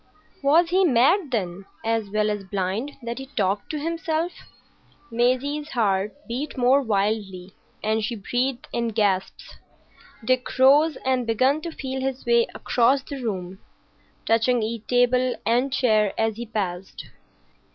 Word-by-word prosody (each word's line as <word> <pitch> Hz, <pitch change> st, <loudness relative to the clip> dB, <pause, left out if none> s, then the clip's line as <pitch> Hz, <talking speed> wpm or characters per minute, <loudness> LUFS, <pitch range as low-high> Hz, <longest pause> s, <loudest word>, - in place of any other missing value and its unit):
Was 325 Hz, +5 st, +4 dB
he 380 Hz, +1 st, +4 dB
mad, 310 Hz, -, +3 dB
then, 195 Hz, -5 st, -3 dB, 0.2 s
as 225 Hz, -2 st, 0 dB
well 210 Hz, +1 st, +1 dB
as 205 Hz, -1 st, -4 dB
blind, 195 Hz, +8 st, -3 dB
that 235 Hz, +2 st, -4 dB
he 270 Hz, -, -8 dB
talked 205 Hz, -6 st, -1 dB
to 310 Hz, -, -3 dB
himself? 330 Hz, +2 st, -2 dB, 0.8 s
Maisie's 255 Hz, +6 st, 0 dB
heart 205 Hz, -4 st, 0 dB
beat 260 Hz, +6 st, -4 dB
more 255 Hz, +3 st, +4 dB
wildly, 200 Hz, -4 st, -2 dB, 0.3 s
and 220 Hz, 0 st, 0 dB
she 235 Hz, +3 st, -2 dB
breathed 245 Hz, +5 st, -2 dB
in 235 Hz, -1 st, 0 dB
gasps. 205 Hz, -4 st, -1 dB, 0.7 s
Dick 255 Hz, +1 st, 0 dB
rose 285 Hz, +4 st, +5 dB
and 255 Hz, -2 st, +1 dB
began 260 Hz, +7 st, +2 dB
to 335 Hz, -, -5 dB
feel 265 Hz, -3 st, -5 dB
his 265 Hz, 0 st, -3 dB
way 235 Hz, -1 st, +3 dB
across 260 Hz, +3 st, +2 dB
the 275 Hz, -2 st, -7 dB
room, 190 Hz, -5 st, -4 dB, 0.7 s
touching 230 Hz, +1 st, +2 dB
each 225 Hz, 0 st, -4 dB
table 250 Hz, 0 st, +2 dB
and 245 Hz, +5 st, +2 dB
chair 215 Hz, -6 st, +2 dB
as 225 Hz, -1 st, 0 dB
he 235 Hz, +1 st, -6 dB
passed. 190 Hz, -4 st, -4 dB
235 Hz, 140 wpm, -24 LUFS, 210-270 Hz, 0.8 s, rose